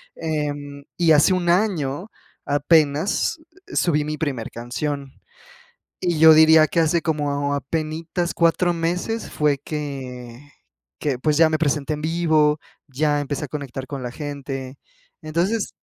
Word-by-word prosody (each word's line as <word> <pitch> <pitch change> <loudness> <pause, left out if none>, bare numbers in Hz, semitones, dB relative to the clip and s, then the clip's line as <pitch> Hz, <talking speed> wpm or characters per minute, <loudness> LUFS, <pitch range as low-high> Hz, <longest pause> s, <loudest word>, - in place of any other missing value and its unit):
Em, 145 -2 -4
y 165 -2 +4
hace 150 +5 +5
1 180 -2 0
año, 175 -2 0 0.3
apenas, 150 - +2 0.3
subí 150 -4 +2
mi 155 0 -3
primer 135 -8 -3
canción 135 +4 -4 0.9
y 170 -3 0
yo 160 0 +9
diría 160 0 +7
que 165 - +1
hace 165 +1 +2
como 145 -3 -1
apenitas 160 +4 -3
4 175 +1 +2
meses 180 +7 -2
fue 150 -2 +1
que 135 -3 -7 0.5
que, 140 -4 -1
pues, 150 +2 +1
ya 165 0 +5
me 155 - +1
presenté 150 -1 0
en 150 - -5
vivo, 155 -2 +2 0.3
ya 145 +2 0
empecé 145 +1 -3
a - - -10
conectar 135 -2 -6
con 140 -3 -6
la 125 - -4
gente. 135 -2 -6 0.5
Entonces 175 +8 -1
150 Hz, 135 wpm, -22 LUFS, 140-165 Hz, 0.9 s, yo